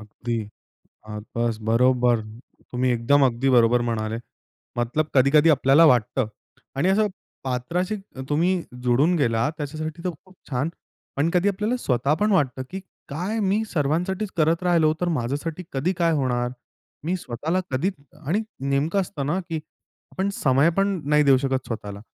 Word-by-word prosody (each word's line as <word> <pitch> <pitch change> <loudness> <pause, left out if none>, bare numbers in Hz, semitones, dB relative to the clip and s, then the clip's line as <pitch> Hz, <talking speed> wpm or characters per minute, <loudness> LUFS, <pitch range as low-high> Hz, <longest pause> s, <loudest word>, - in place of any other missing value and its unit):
अगदी. 115 +2 -4 0.7
अ, 105 0 -5 0.2
बसं, 115 -2 -1
बरोबर. 120 0 +3 0.5
तुम्ही 125 +1 +1
एकदम 130 +4 +3
अगदी 125 +2 0
बरोबर 120 -1 +5
म्हणाले, 110 0 -2 0.6
मतलब 150 +6 0
कधी-कधी 140 +4 +5
आपल्याला 140 +2 +5
वाटतं 125 -1 +3 0.5
आणि 150 +7 +2
असं 210 +2 +3 0.4
पात्राशी 170 - -1
त 195 -9 -15
तुम्ही 165 +5 +2 0.3
जोडून 130 +8 +3
गेला, 115 -5 +1
त्याच्यासाठी 155 +3 -5
तर 180 - 0
खूप 185 0 -20 0.2
छानं. 140 +4 0 0.5
पण 150 +4 +2
कधी 180 +3 +3
आपल्याला 210 +5 0
स्वतः 135 - +1
पण 210 0 +3
वाटतं 130 -8 +1
की 190 +1 -5 0.3
काय 180 +10 -3
मी 205 +2 +1
सर्वांसाठीचं 180 +7 -1
करत 165 +3 +2
राहिलो, 165 -3 +4
तर 180 - +1
माझ्यासाठी 145 +8 -3
कधी 140 +7 0
काय 170 -2 +3
होणार? 125 -4 0 0.5
मी 175 +4 0
स्वतःला 160 +4 -2
कधी 140 +9 0 0.4
आणि 195 +9 +1 0.3
नेमकं 150 +8 +1
असतं 150 -7 -4
ना 160 +6 0
की 165 - -2 0.6
आपण 190 +1 -1
समय 135 +4 +4
पण 195 -2 +1
नाही 150 0 +5
देऊ 135 -2 +6
शकत 135 -1 -1
स्वतःला. 105 -3 -6
145 Hz, 150 wpm, -24 LUFS, 125-175 Hz, 0.7 s, देऊ